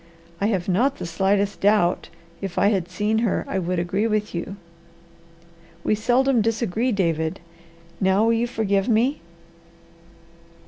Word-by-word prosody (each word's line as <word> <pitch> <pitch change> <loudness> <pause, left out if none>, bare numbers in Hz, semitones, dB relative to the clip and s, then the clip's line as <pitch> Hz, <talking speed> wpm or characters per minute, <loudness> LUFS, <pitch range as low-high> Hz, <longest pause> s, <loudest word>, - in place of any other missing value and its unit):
I 200 - +2
have 190 -5 -1
not 245 +10 +2
the - - -5
slightest 195 +4 0
doubt 205 -3 +2 0.3
if 195 -3 -5
I 200 - +4
had 185 -5 -1
seen 210 +4 0
her 225 -4 0
I 190 - -1
would 180 0 -2
agree 185 +5 0
with 215 -1 -1
you. 175 +3 -4 1.3
We - - +2
seldom 245 +3 +2
disagree, 225 +2 0
David. 165 -6 0 0.6
Now, 190 +2 +3
will 230 - +3
you 230 +1 +1
forgive 200 -3 0
me?" 240 +6 +2
205 Hz, 140 wpm, -23 LUFS, 185-225 Hz, 1.3 s, I